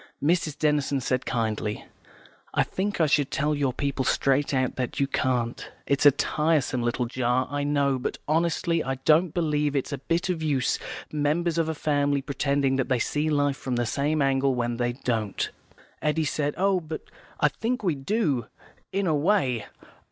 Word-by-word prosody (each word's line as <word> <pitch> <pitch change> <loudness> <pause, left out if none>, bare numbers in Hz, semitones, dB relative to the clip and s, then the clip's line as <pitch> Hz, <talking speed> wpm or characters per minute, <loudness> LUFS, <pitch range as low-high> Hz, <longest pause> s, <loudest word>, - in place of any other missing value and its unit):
Mrs. 155 -1 +1
Denison 145 -2 +1
said 130 0 -1
kindly, 110 -3 -2 0.7
"I - - +4
think 200 +1 -3
I 160 - +5
should 145 -2 +2
tell 150 +2 0
your 140 -3 +1
people 140 0 -2
straight 135 +2 +2
out 130 -2 0
that 125 -2 -3
you 140 - +3
can't. 125 -3 -1 0.2
It's 140 +1 +4
a - - +9
tiresome 150 -2 +1
little 120 +1 0
jar, 125 +1 0
I 145 0 -1
know, 140 -2 +1
but 125 - -3
honestly, 165 +1 +1
I 135 0 -2
don't 160 +2 +4
believe 150 -3 0
it's 140 +1 -1
a 140 - -3
bit 165 +7 -1
of 175 -3 -1
use 140 -5 +1 0.3
members 155 +3 +1
of 160 -1 +1
a 160 - -2
family 145 -2 +1
pretending 140 -1 0
that 135 - -1
they 130 - +3
see 150 +6 0
life 145 -2 +1
from 130 -3 -3
the 120 0 0
same 145 +5 0
angle 135 -1 +2
when 120 -1 -1
they 120 0 0
don't." 115 -5 -2 0.5
Eddy 155 +1 +1
said, 145 0 -1
"Oh, 195 0 +2
but 160 -2 -6 0.4
I - - +4
think 240 +1 -2
we 180 -5 +2
do, 140 - 0 0.4
in 195 0 0
a 165 - +2
way. 145 - +1
145 Hz, 180 wpm, -26 LUFS, 130-155 Hz, 0.7 s, a